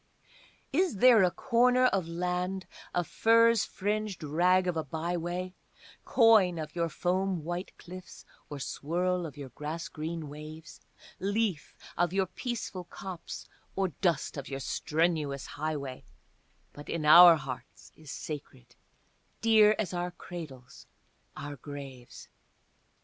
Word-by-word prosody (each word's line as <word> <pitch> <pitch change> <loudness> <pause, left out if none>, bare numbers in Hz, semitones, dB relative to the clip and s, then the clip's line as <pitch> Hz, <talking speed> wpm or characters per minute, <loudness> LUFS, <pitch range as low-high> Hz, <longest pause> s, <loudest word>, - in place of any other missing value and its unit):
Is 355 - +2
there 235 +1 +7
a 180 - +5
corner 250 +4 +3
of 195 -8 +1
land, 180 +2 -2 0.3
a 175 - 0
furze 230 +4 +4
fringed 210 -2 -3
rag 180 +5 +3
of 180 -2 -1
a 160 - -1
by 160 +4 -3
way, 175 +2 -3 0.5
Coign 215 -7 +5
of 155 0 -6
your 170 -1 0
foam 185 0 -1
white 175 +3 -5
cliffs 180 0 -11 0.2
or 145 - -6
swirl 175 +6 -1
of 145 -2 -12
your 140 -2 -7
grass 150 +6 -5
green 160 0 -5
waves, 155 +2 -10 0.4
Leaf 200 -4 -1 0.2
of 175 0 +2
your 195 0 +2
peaceful 200 -4 -5
copse, 180 0 -8 0.3
or 195 -1 +1
dust 165 -2 -1
of 140 - -6
your 135 -1 -4
strenuous 150 -1 -1
highway, 145 -4 -4 0.7
But 145 - -11
in 160 -2 -2
our 170 +2 +10
hearts 135 -4 -8
is 155 -2 -14
sacred, 145 - -8 0.7
dear 215 -2 +6
as 190 -5 -2
our 175 0 -2
cradles, 155 -8 -10 0.5
our 145 0 -6
graves? 135 -2 -10
175 Hz, 130 wpm, -30 LUFS, 150-190 Hz, 0.7 s, our